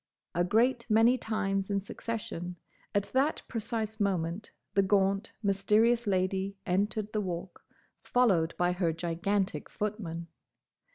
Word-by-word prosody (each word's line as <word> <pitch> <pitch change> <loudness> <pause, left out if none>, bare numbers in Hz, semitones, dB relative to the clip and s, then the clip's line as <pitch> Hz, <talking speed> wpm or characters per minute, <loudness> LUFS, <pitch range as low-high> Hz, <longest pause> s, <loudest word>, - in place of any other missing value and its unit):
a 175 - +2
great 235 +6 +3
many 225 +3 +5
times 200 -5 -1
in 200 -1 +1
succession; 195 -4 -5 0.4
at 205 - +3
that 275 +4 +2
precise 220 -1 -3
moment 190 -1 -1 0.2
the 200 - +4
gaunt 195 +2 +2
Mysterious 215 +4 +3
Lady 190 +1 0
entered 205 +3 0
the 215 - +1
Walk, 180 -1 -5 0.4
followed 190 -10 +2
by 175 0 +2
her 180 -2 +1
gigantic 175 +4 -1
footman. 200 -6 -4
200 Hz, 120 wpm, -30 LUFS, 180-220 Hz, 0.4 s, many